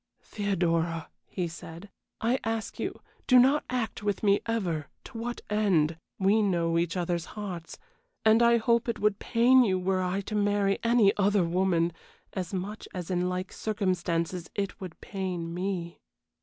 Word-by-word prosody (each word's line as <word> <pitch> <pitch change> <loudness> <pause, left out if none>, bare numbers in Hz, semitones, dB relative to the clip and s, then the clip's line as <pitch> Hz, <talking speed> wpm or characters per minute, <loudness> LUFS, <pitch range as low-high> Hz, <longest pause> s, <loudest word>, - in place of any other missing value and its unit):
"Theodora," 170 -5 -1 0.2
he 180 -3 -3
said, 170 +3 -10 0.3
"I 240 +4 +1
ask 225 0 -3
you - - -4 0.3
do 255 - +7
not 270 +4 +5
act 245 -4 -2
with 205 0 -2
me 200 -1 +4
ever 175 -10 -1 0.2
to 260 - -13
what 240 +1 -4
end? 185 -7 +2 0.2
We 200 +3 +3
know 170 -4 +1
each 170 +1 -1
other's 175 -1 -1
hearts, 180 -5 -6 0.5
and 220 +1 +6
I 235 0 +6
hope 235 +1 +2
it 235 - -1
would 210 -1 +1
pain 250 +2 +5
you 190 -5 +2
were 185 +1 0
I 185 +2 -1
to 205 - -7
marry 205 -1 +2
any 230 -4 +4
other 200 -1 +3
woman, 170 -1 +1 0.4
as 185 -3 -4
much 200 +3 -5
as 180 0 -4
in 180 0 +1
like 185 +1 -3
circumstances 180 -4 -1
it 200 -1 -3
would 180 -4 -8
pain 180 -4 -4
me." 180 -2 -3
195 Hz, 160 wpm, -28 LUFS, 175-215 Hz, 0.5 s, do